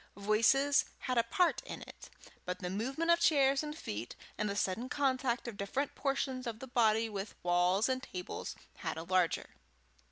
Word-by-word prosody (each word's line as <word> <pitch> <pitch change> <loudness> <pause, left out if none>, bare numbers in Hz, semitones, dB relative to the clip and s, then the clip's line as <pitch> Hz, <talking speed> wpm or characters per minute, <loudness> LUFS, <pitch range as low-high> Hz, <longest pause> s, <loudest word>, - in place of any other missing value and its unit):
Voices 230 +8 +4 0.2
had 255 -2 +1
a - - +4
part 345 +10 +2
in - - -7
it, - - -12 0.3
but 180 0 -3
the 180 0 -4
movement 270 - 0
of 340 - +5
chairs 275 -4 +4
and 300 0 -5
feet 110 - -5 0.2
and 210 - -1
the 200 - -2
sudden 205 +5 -1
contact 260 -4 0
of 225 -4 -6
different 255 +9 -2
portions 265 -2 -1
of 225 -2 -3
the 265 - -8
body 225 -3 +3
with 205 -1 -5
walls 180 +4 +3
and 260 0 0
tables, 180 -6 -6 0.2
had - - -4
a 160 - -4
larger. 180 -1 +1
235 Hz, 180 wpm, -33 LUFS, 200-270 Hz, 0.3 s, of